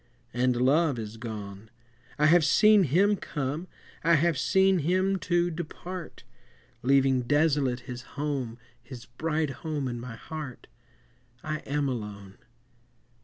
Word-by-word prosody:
And 125 Hz, 0 st, +2 dB
Love 140 Hz, +3 st, +3 dB
is 110 Hz, 0 st, -6 dB
gone; 105 Hz, -2 st, -7 dB, 0.5 s
I 150 Hz, -, +3 dB
have 165 Hz, +2 st, +6 dB
seen 210 Hz, +2 st, +5 dB
him 195 Hz, +9 st, +3 dB
come, 150 Hz, -1 st, -4 dB, 0.4 s
I 170 Hz, +1 st, +5 dB
have 165 Hz, +2 st, +2 dB
seen 190 Hz, +4 st, +3 dB
him, 185 Hz, +5 st, +1 dB
too, 175 Hz, -1 st, +1 dB
depart, 175 Hz, +1 st, -7 dB, 0.6 s
Leaving 135 Hz, 0 st, +3 dB
desolate 145 Hz, -2 st, +1 dB
his 125 Hz, 0 st, -7 dB, 0.2 s
home, 140 Hz, -6 st, -2 dB, 0.2 s
His 120 Hz, 0 st, -10 dB
bright 155 Hz, +4 st, -2 dB
home 150 Hz, -4 st, -2 dB
in 120 Hz, -1 st, -4 dB
my 120 Hz, -1 st, -7 dB
heart. 150 Hz, +1 st, -8 dB, 0.8 s
I 155 Hz, -1 st, -3 dB
am 145 Hz, 0 st, 0 dB
alone! 105 Hz, -6 st, -6 dB
145 Hz, 125 wpm, -27 LUFS, 125-170 Hz, 0.8 s, have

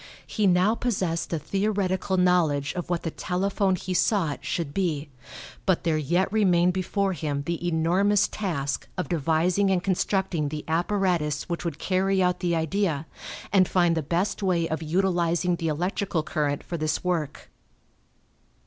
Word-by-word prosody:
He 210 Hz, -2 st, 0 dB
now 185 Hz, +4 st, +4 dB
possessed 190 Hz, -9 st, -1 dB
a 165 Hz, -, 0 dB
theoretical 190 Hz, +2 st, -1 dB
knowledge 165 Hz, -6 st, +2 dB
of 175 Hz, -1 st, -5 dB
what 175 Hz, -2 st, -1 dB
the 165 Hz, -, -2 dB
telephone 190 Hz, +2 st, 0 dB
he 185 Hz, +1 st, -4 dB
sought 175 Hz, -4 st, +1 dB
should 160 Hz, -5 st, -3 dB
be, 160 Hz, -6 st, -1 dB, 0.6 s
but 190 Hz, -3 st, +2 dB
there 165 Hz, -2 st, +1 dB
yet 175 Hz, +7 st, 0 dB
remained 180 Hz, -4 st, +3 dB
before 190 Hz, +1 st, 0 dB
him 145 Hz, -3 st, -3 dB
the 170 Hz, +3 st, -3 dB
enormous 180 Hz, +5 st, +2 dB
task 150 Hz, -9 st, -3 dB
of 180 Hz, -, -3 dB
devising 170 Hz, +4 st, +1 dB
and 185 Hz, -2 st, +1 dB
constructing 190 Hz, -4 st, 0 dB
the 150 Hz, 0 st, -6 dB
apparatus 170 Hz, -3 st, 0 dB
which 170 Hz, -1 st, -3 dB
would 165 Hz, -4 st, -3 dB
carry 190 Hz, +2 st, +1 dB
out 180 Hz, -1 st, +2 dB
the 175 Hz, -2 st, 0 dB
idea, 160 Hz, -1 st, 0 dB, 0.5 s
and 185 Hz, -2 st, +5 dB
find 175 Hz, -2 st, +2 dB
the 160 Hz, -, 0 dB
best 175 Hz, +8 st, -1 dB
way 175 Hz, -4 st, +1 dB
of 160 Hz, 0 st, -3 dB
utilizing 175 Hz, +1 st, +1 dB
the 165 Hz, -, -2 dB
electrical 175 Hz, +1 st, -1 dB
current 145 Hz, -3 st, -1 dB
for 170 Hz, -, -5 dB
this 155 Hz, -1 st, -1 dB
work. 170 Hz, -5 st, -3 dB
175 Hz, 155 wpm, -26 LUFS, 160-190 Hz, 0.6 s, and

